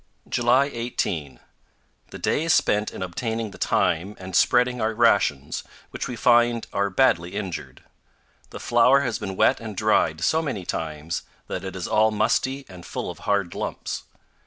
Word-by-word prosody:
JULY 125 Hz, +4 st, +2 dB
18. 100 Hz, -, -3 dB, 0.7 s
The -, -, -8 dB
day 155 Hz, -, 0 dB
is 165 Hz, -, +4 dB
spent 105 Hz, +1 st, +1 dB
in -, -, -5 dB
obtaining 110 Hz, +4 st, -3 dB
the -, -, -13 dB
time 95 Hz, +6 st, +1 dB
and 95 Hz, -1 st, -7 dB
spreading 125 Hz, +4 st, +3 dB
our 110 Hz, 0 st, 0 dB
rations, 100 Hz, -, +2 dB, 0.3 s
which -, -, -4 dB
we 125 Hz, -, -5 dB
find 120 Hz, 0 st, +3 dB
are 100 Hz, 0 st, +1 dB
badly 95 Hz, -4 st, +2 dB
injured. 95 Hz, -5 st, -5 dB, 0.7 s
The -, -, -9 dB
flour 125 Hz, +4 st, +4 dB
has 125 Hz, -6 st, -2 dB
been 95 Hz, -1 st, -5 dB
wet -, -, +3 dB
and -, -, -7 dB
dried 80 Hz, 0 st, +2 dB
so 160 Hz, -, +2 dB
many 125 Hz, -, -4 dB
times 80 Hz, -1 st, -3 dB, 0.2 s
that 90 Hz, -, -5 dB
it 95 Hz, 0 st, -6 dB
is 90 Hz, -, -4 dB
all 110 Hz, +1 st, +4 dB
musty 130 Hz, +5 st, 0 dB
and 90 Hz, -2 st, -12 dB
full -, -, -4 dB
of -, -, -12 dB
hard 100 Hz, -4 st, +1 dB
lumps. -, -, -4 dB
105 Hz, 165 wpm, -24 LUFS, 90-120 Hz, 0.7 s, is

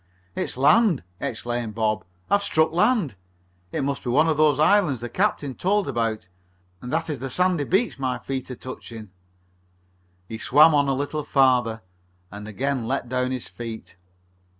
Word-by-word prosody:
"It's -, -, -3 dB
land!" 175 Hz, -, +4 dB, 0.2 s
exclaimed 120 Hz, -1 st, -4 dB
Bob. 110 Hz, -1 st, 0 dB, 0.2 s
"I've 200 Hz, -, +3 dB
struck 160 Hz, -5 st, +2 dB
land! 180 Hz, -, +2 dB, 0.6 s
It -, -, -2 dB
must 140 Hz, 0 st, -2 dB
be 125 Hz, -, -3 dB
one 150 Hz, +6 st, +3 dB
of 160 Hz, -, +2 dB
those 150 Hz, -2 st, +3 dB
islands 155 Hz, -, +3 dB
the 120 Hz, +1 st, -6 dB
captain 150 Hz, -, 0 dB
told 200 Hz, +7 st, 0 dB
about 115 Hz, -6 st, -2 dB, 0.5 s
and 125 Hz, -, -7 dB
that 165 Hz, +1 st, -1 dB
is 150 Hz, -5 st, -4 dB
the 135 Hz, +2 st, -5 dB
sandy 180 Hz, +1 st, +1 dB
beach 195 Hz, -, 0 dB
my 130 Hz, -2 st, -1 dB
feet 130 Hz, +2 st, -5 dB
are 125 Hz, -, -5 dB
touching." 115 Hz, -5 st, -9 dB, 1.2 s
He 110 Hz, +2 st, -7 dB
swam 155 Hz, +6 st, +6 dB
on 145 Hz, -1 st, +3 dB
a 135 Hz, -, +1 dB
little 145 Hz, +2 st, -3 dB
further, 125 Hz, -7 st, +2 dB, 0.5 s
and 105 Hz, +1 st, -8 dB
again 125 Hz, +3 st, -2 dB
let 130 Hz, -2 st, -2 dB
down 125 Hz, 0 st, 0 dB
his 130 Hz, -2 st, -4 dB
feet. 115 Hz, -4 st, -8 dB
135 Hz, 165 wpm, -24 LUFS, 120-155 Hz, 1.2 s, swam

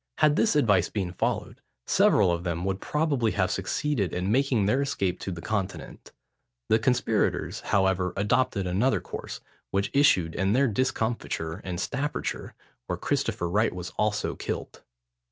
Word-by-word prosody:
Had 150 Hz, -1 st, +4 dB
this 220 Hz, -2 st, +2 dB
advice 100 Hz, -, +3 dB
been 95 Hz, -4 st, -2 dB
followed, 90 Hz, -, -2 dB, 0.2 s
several 95 Hz, -4 st, +4 dB
of 85 Hz, 0 st, -2 dB
them 85 Hz, 0 st, -2 dB
would 95 Hz, 0 st, -2 dB
probably 145 Hz, -7 st, 0 dB
have 95 Hz, -2 st, +1 dB
succeeded 100 Hz, +2 st, -1 dB
in 90 Hz, +3 st, -1 dB
making 125 Hz, -4 st, +2 dB
their 130 Hz, +7 st, +2 dB
escape 100 Hz, -10 st, -1 dB
to 95 Hz, -, -4 dB
the 85 Hz, -1 st, -7 dB
Continent. 100 Hz, -3 st, -4 dB, 0.6 s
The 110 Hz, -, +4 dB
conspirators, 120 Hz, -2 st, 0 dB
however, 95 Hz, -2 st, +1 dB
adopted 100 Hz, -1 st, +1 dB
another 100 Hz, +9 st, +1 dB
course, -, -, -7 dB, 0.3 s
which 100 Hz, +1 st, -1 dB
issued 110 Hz, -, +4 dB
in 95 Hz, +3 st, +1 dB
their 135 Hz, +3 st, +4 dB
discomfiture 110 Hz, -8 st, -2 dB
in 90 Hz, -3 st, -5 dB
Staffordshire, 145 Hz, +10 st, -3 dB, 0.3 s
where -, -, -2 dB
Christopher 85 Hz, -, -1 dB
Wright 105 Hz, +3 st, +1 dB
was 90 Hz, 0 st, -6 dB
also 105 Hz, 0 st, -1 dB
killed. -, -, -5 dB
100 Hz, 150 wpm, -27 LUFS, 90-130 Hz, 0.6 s, Had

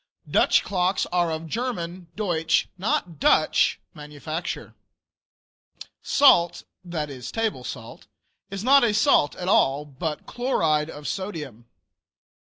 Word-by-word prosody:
Dutch -, -, +3 dB
clocks 185 Hz, -1 st, 0 dB
are 175 Hz, -1 st, +1 dB
of 160 Hz, 0 st, -4 dB
German 180 Hz, -4 st, -4 dB
(Deutsch), 170 Hz, -6 st, 0 dB
not 180 Hz, -4 st, -2 dB
Dutch -, -, +3 dB
manufacture. 150 Hz, +3 st, -6 dB, 1.3 s
Salt 175 Hz, -11 st, +4 dB, 0.2 s
(that 160 Hz, -5 st, -4 dB
is 125 Hz, -2 st, -8 dB
table 220 Hz, -, -2 dB
salt) 115 Hz, -3 st, -9 dB, 0.4 s
is 195 Hz, 0 st, -5 dB
not 275 Hz, +2 st, +6 dB
a 220 Hz, -3 st, +2 dB
salt 215 Hz, -, +3 dB
at 180 Hz, -, -6 dB
all, 145 Hz, -6 st, +3 dB
but 150 Hz, +2 st, -5 dB
"chloride 160 Hz, -, 0 dB
of 145 Hz, -1 st, -8 dB
sodium." 150 Hz, -, -5 dB
170 Hz, 115 wpm, -24 LUFS, 150-200 Hz, 1.3 s, not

